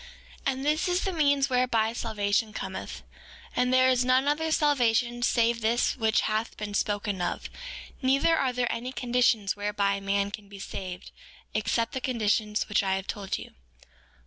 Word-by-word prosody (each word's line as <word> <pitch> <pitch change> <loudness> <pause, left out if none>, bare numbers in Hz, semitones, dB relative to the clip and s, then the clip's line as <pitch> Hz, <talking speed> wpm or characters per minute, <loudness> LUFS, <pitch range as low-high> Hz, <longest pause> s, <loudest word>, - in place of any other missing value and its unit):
4:8 - - +4
And 265 +1 -5
this 305 +4 +1
is 360 +1 +1
the 385 - -1
means 285 -4 +3
whereby 250 -3 +1
salvation 215 -1 -1
cometh. - - -6 0.5
And 250 0 +2
there 255 0 +5
is 255 -1 +3
none 255 +2 +3
other 315 +2 +1
salvation 240 -5 +2
save 235 -1 +2
this 230 +2 +1
which 220 -3 +2
hath 215 +1 -2
been 210 -1 -5
spoken 205 -1 -1
of; 175 - -3 0.5
neither 275 +5 +3
are 270 -5 +1
there 245 -1 -1
any 240 +2 -4
conditions 240 -4 +1
whereby 205 -1 0
man 200 0 0
can 200 0 -9
be 200 - -10
saved 185 -2 -7 0.4
except 230 -1 0
the 260 - -3
conditions 215 -4 0
which 210 - +2
I 190 -1 0
have 190 0 -4
told 195 -2 -3
you. - - -10
230 Hz, 170 wpm, -27 LUFS, 205-255 Hz, 0.5 s, there